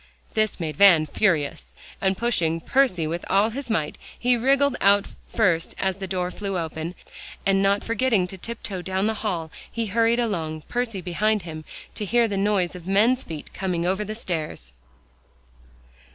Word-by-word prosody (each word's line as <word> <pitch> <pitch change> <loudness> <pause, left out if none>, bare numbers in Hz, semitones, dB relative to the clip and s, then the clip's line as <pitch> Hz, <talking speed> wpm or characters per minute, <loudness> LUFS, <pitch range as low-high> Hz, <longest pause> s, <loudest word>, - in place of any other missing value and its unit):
This 215 -2 +1
made 155 -4 -4
Van 180 -6 +7
furious, 155 -5 0 0.3
and 190 -1 +1
pushing 170 -9 +1
Percy 185 -4 +2
with 170 +3 -3
all 205 +3 +3
his 265 +2 -5
might, 160 -9 -1 0.2
he 245 0 +3
wriggled 270 +3 +3
out 200 +1 +5 0.2
first 180 -7 +1
as 190 0 -1
the 190 - -4
door 180 -1 -2
flew 195 -1 -3
open, 165 +1 -4 0.5
and 195 0 +3
not 200 +1 +2
forgetting 230 -4 +2
to 190 - -4
tiptoe 200 -2 -5
down 190 +2 -1
the 220 - +1
hall, 170 -7 -2 0.2
he 230 -1 -2
hurried 230 +3 +2
along, 165 -9 -2
Percy 235 -3 -3
behind 210 +4 0
him, 155 -2 -8 0.3
to - - -4
hear 235 +3 +3
the 205 - -3
noise 195 -3 +1
of 180 -1 -10
men's 225 +7 +3
feet 155 -3 -8
coming 180 -3 -2
over 190 +3 0
the 215 +1 -5
stairs. 155 - -4
195 Hz, 165 wpm, -24 LUFS, 170-220 Hz, 0.5 s, Van